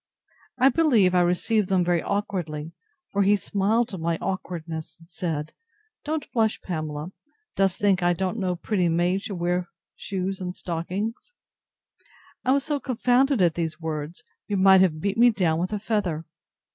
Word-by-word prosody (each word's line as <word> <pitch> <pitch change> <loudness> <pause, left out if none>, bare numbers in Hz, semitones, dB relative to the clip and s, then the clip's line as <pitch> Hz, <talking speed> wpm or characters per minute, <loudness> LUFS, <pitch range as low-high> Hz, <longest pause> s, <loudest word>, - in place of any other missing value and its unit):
I 265 - +6
believe 240 - +3
I 180 - +4
received 185 +4 +1
them 185 -2 +2
very 175 -1 +2
awkwardly; 175 -7 -3 0.4
for 200 - +1
he 200 +1 +5
smiled 205 +3 0
at 190 - -4
my 165 0 0
awkwardness, 165 -4 -5
and 165 0 -19
said, 160 -3 -4 0.5
Don't 305 0 -2
blush, 220 -3 +1
Pamela: 155 -1 -4 0.4
Dost 195 -2 +2
think 195 -3 +2
I 175 0 +3
don't 190 +5 -2
know 185 -2 0
pretty 180 -1 0
maids 175 +4 +1
should 200 - -4
wear 175 +1 -1 0.3
shoes 190 0 -4
and 180 0 -4
stockings? 190 - -4 1.1
I 255 - +2
was 275 0 +3
so 295 -1 -1
confounded 255 -2 +2
at 170 -2 +3
these 165 -1 -3
words, 160 +5 -5 0.2
you 205 - -1
might 190 0 +7
have 160 -5 +2
beat 200 +4 -1
me 240 +1 +8
down 175 -8 +1
with 180 +3 -2
a 210 - -1
feather. 200 -7 -1
185 Hz, 165 wpm, -25 LUFS, 170-210 Hz, 1.1 s, me